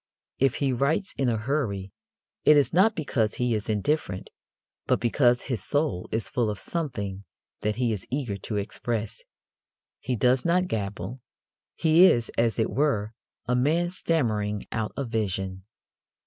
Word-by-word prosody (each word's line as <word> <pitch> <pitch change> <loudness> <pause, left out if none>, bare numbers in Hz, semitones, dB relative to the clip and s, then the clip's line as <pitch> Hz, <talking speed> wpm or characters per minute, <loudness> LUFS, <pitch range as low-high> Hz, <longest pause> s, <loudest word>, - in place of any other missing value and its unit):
If 135 -1 +3
he 135 -2 0
writes 145 +10 0
in 135 -3 +1
a 115 - +1
hurry, 105 -6 -2 0.5
it 150 - +7
is 145 - +2
not 200 +6 +4
because 115 -8 0
he 125 -1 0
is 110 0 -2
indifferent, 105 -2 -1 0.6
but - - +3
because 120 +1 +3
his 120 -8 -3
soul 145 - -1
is 110 0 -1
full 120 -3 0
of 105 - -3
something 105 - -4 0.4
that 105 0 -1
he 120 -2 +1
is 100 -4 -6
eager 130 -7 -2
to 105 +3 -5
express. 110 +2 -3 0.8
He 125 +2 -2
does 125 +3 +3
not 180 +2 +2
gabble; 105 - -4 0.5
he 165 +3 +6
is, 120 -10 +3
as 115 -1 +1
it 110 -1 +1
were, 115 -7 0 0.3
a 125 - 0
man 160 +7 +2
stammering 110 - 0
out 110 -1 -2
a 140 - -1
vision. 95 -4 -2
120 Hz, 155 wpm, -26 LUFS, 105-145 Hz, 0.8 s, it